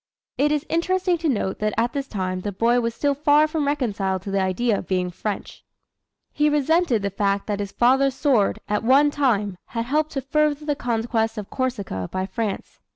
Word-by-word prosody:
It 290 +3 +2
is 300 +1 0
interesting 360 +1 +1
to 325 -1 0
note 205 -6 -1
that 215 0 -1
at 235 +1 +1
this 275 -1 -3
time 185 -4 -3
the 205 +2 -4
boy 235 +5 +2
was 230 0 -2
still 285 -1 +1
far 295 +1 +4
from 305 -2 -1
reconciled 200 -10 -1
to 195 - -5
the 195 0 +1
idea 200 +4 +1
of - - -9
being 180 0 0
French. 205 +3 -5 0.7
He 300 0 +2
resented 295 - +2
the 200 - -1
fact 200 0 0
that 205 -1 -2
his 200 -1 -4
father's 265 +2 +3
sword, 255 -10 +2
at 210 0 -1
one 275 +5 +5
time, 210 -10 0
had 230 -1 -4
helped 305 +4 0
to 270 - -2
further 300 +2 0
the 295 -1 0
conquest 225 -2 -1
of 210 -2 -6
Corsica 205 - -3
by 185 0 -2
France. 200 +1 -4
240 Hz, 200 wpm, -23 LUFS, 200-290 Hz, 0.7 s, one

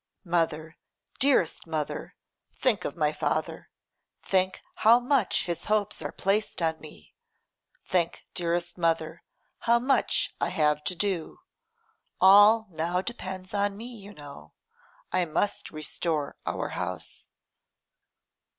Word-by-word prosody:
'Mother, 160 -2 -1 0.4
dearest 260 - +2
mother, 155 -2 -4 0.4
think - - +1
of - - -4
my - - +2
father; - - -2 0.5
think 185 0 +1 0.2
how 230 +2 +6
much 245 -4 +1
his 170 -2 -4
hopes 210 -1 0
are - - -4
placed 205 +3 0
on 160 -2 0
me; 145 - -14 0.7
think, 175 -3 0
dearest 175 0 -2
mother, 165 -1 0 0.4
how 235 0 +4
much 260 +3 +1
I - - +1
have 150 -1 +1
to 180 - 0
do. 185 -3 -2 0.8
All 205 +4 +7
now 170 +3 -1
depends 190 -5 -6
on 200 0 0
me, 240 +3 -8
you 205 -2 -11
know. 145 -6 -12 0.6
I 180 -1 +2
must 170 +5 -1
restore 155 -1 -3
our - - -2
house. - - -5
180 Hz, 120 wpm, -28 LUFS, 160-205 Hz, 0.8 s, All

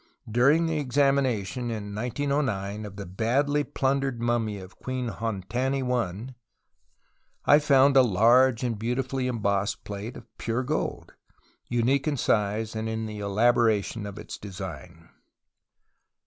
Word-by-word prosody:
During 135 +9 +4
the 160 -2 0
examination 130 -5 +1
(in 105 -3 -5
1909) 110 -4 -2
of 100 - -11
the 100 0 -6
badly 130 +10 +1
plundered 135 -3 -1
mummy 115 -3 0
of 95 -1 -12
Queen 130 -2 -3
Hontaui 120 +2 -2 1.1
I 145 - +7
found 140 -2 +4
a 135 - +9
large 120 +3 +4
and 115 -4 -2
beautifully 125 +3 -1
embossed 100 -4 -1
plate 105 +3 -6
of 120 - -12
pure 115 +2 -1
gold, 150 +5 -3 0.6
unique 125 +4 +1
in 145 -2 0
size 110 0 0
and 110 0 -2
in 110 0 -3
the 105 -1 -6
elaboration 110 0 +2
of 100 0 -8
its - - -8
design. 85 -4 -8
115 Hz, 125 wpm, -26 LUFS, 105-130 Hz, 1.1 s, a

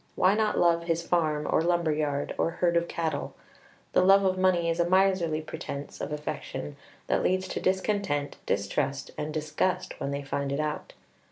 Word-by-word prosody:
Why 185 +2 +4
not 215 0 +1
love 170 -1 +3
his 170 0 -1
farm, 155 -4 +1
or - - +2
lumber 170 -1 +2
yard, 150 -2 -1
or - - +2
herd 170 0 0
of 170 0 +2
cattle? 165 -2 -3 0.6
The - - +5
love 195 +1 +6
of 185 -1 +2
money 185 -2 +2
is 165 +1 0
a 170 0 +2
miserly 185 -4 +3
pretence 140 -2 -7
of - - -4
affection 145 - -5 0.3
that - - +1
leads 185 0 +1
to - - -3
discontent, 190 -7 0
distrust, 135 +7 -1
and 150 +1 -4
disgust 155 +4 -1
when - - -2
they 140 0 -3
find 140 0 -2
it 140 - -1
out. 155 0 -3
165 Hz, 180 wpm, -28 LUFS, 150-185 Hz, 0.6 s, love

